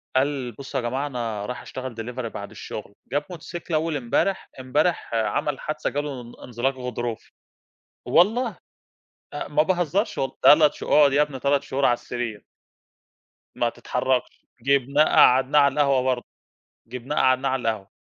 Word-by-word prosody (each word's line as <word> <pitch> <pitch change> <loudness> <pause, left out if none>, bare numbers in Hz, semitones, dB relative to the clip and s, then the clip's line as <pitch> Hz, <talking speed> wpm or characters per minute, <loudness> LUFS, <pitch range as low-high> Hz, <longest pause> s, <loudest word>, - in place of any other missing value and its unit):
قال 130 -2 0
بُصوا 135 +3 -5
يا 120 - -4
جماعة 135 +3 -2
أنا 115 -6 -4
رايح 125 - -5
أشتغل 130 -3 -7
Delivery 120 +2 -5
بعد 100 - -7
الشغل - - -8 0.2
جاب 145 +2 0
موتوسيكل 175 0 -7
أول 155 0 +1
امبارح، 145 +10 0
امبارح 145 +2 0
عمل 125 +5 0
حادثة 155 - -3
جا 145 - -1
له 140 -4 -5
ان 120 0 -12
انزلاق 125 +2 -1
غضروفي، 120 -3 -5 0.8
والله، 220 +5 +3 0.8
أ - - -4
ما 150 +1 +3
باهزرش 180 +4 0
والله 135 - -2
تلات 150 0 +7
شه - - -8
اقعد 145 -2 +5
يا 145 +2 +4
ابني 145 -3 -3
3 140 +1 +2
شهور 140 -1 -2
على 120 - +5
السرير. 120 -3 -5 1.1
ما - - +1
تتحركش، 130 -1 -2 0.2
جِبناه 140 +3 +3
قعَّدناه 130 +2 +5
على 140 -1 +3
القهوة 140 -3 +3
برضو، 125 -1 -1 0.6
جِبناه 125 +5 -5
قعَّدناه 130 0 +3
على 130 -1 -1
القهوة، 100 -3 -5
135 Hz, 155 wpm, -24 LUFS, 125-150 Hz, 1.1 s, تلات